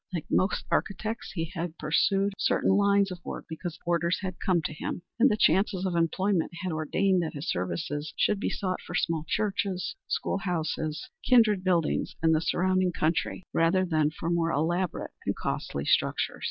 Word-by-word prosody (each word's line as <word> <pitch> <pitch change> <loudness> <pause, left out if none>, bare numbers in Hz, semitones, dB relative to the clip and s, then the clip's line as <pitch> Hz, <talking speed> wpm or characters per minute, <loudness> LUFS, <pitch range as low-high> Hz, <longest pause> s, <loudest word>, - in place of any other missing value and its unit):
Like 170 -4 -3
most 190 +3 +1
architects 220 +3 -1
he 165 -1 -3
had 170 -2 -4
pursued 195 +6 +2
certain - - +2
lines 200 0 +3
of 175 -2 -8
work - - -6
because 160 +1 -6
orders 170 0 +1
had 185 -2 -5
come 175 -4 +1
to - - -3
him, 165 +3 -5 0.2
and 265 +4 +6
the 210 - +1
chances 195 -2 +3
of 180 -2 -1
employment 175 +2 +1
had 185 - -1
ordained 180 +4 +1
that 160 -2 -4
his 145 +2 -5
services 145 - -3
should 210 - +2
be - - -1
sought 185 -2 -2
for 175 - -7
small 165 -3 0
churches, 195 -3 -1
school - - -1
houses 160 0 -2
and - - -12
kindred 220 -6 +5
buildings 175 -4 +1
in 160 - +5
the 160 -1 +3
surrounding 185 +1 +1
country 165 +2 -1
rather 180 +3 +3
than 155 -4 +2
for 165 +2 -4
more 170 -1 +1
elaborate 170 +4 -1 0.2
and - - +1
costly 70 0 -3
structures. - - +1
175 Hz, 180 wpm, -28 LUFS, 160-195 Hz, 0.2 s, and